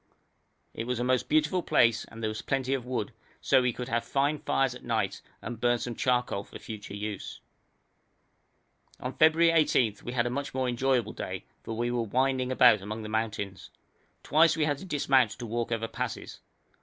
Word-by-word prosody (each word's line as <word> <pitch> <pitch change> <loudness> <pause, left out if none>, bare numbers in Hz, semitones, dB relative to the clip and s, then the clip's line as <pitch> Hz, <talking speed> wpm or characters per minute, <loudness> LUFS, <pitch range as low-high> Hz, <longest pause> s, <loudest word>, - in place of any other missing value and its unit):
It 115 - -5
was 125 -1 -1
a - - 0
most 125 0 +1
beautiful 155 +4 +2
place 115 -8 +3
and 115 0 -11
there - - +1
was 110 0 -4
plenty 135 -1 -1
of 125 -3 -3
wood, 120 -3 -3 0.3
so 130 -2 +4
we 125 -1 +1
could 125 +1 -6
have 115 -2 0
fine 145 +2 0
fires 135 -2 +1
at 125 - -11
night 110 -5 -1 0.2
and 120 -2 -6
burn 120 0 +3
some 120 0 -4
charcoal 125 -4 0
for - - -11
future 105 -2 -8
use. 105 -1 -5 1.6
On 125 +1 -4
February 160 +1 +5
18 130 -9 +3
we 120 - -5
had 120 -2 +1
a 120 - -1
much 140 +1 -4
more 130 -1 0
enjoyable 125 -1 +1
day, - - -5 0.2
for 115 - -6
we 120 +1 0
were 120 -1 0
winding 130 +3 0
about 125 -5 +6
among 110 +3 -5
the 105 - -6
mountains. 105 -3 -3 0.5
Twice 165 +1 +4
we 155 - +2
had 145 -2 -1
to - - -9
dismount 135 - +3
to 120 - -6
walk 120 +1 -3
over 115 -1 -1
passes. - - -5
125 Hz, 195 wpm, -28 LUFS, 115-135 Hz, 1.6 s, about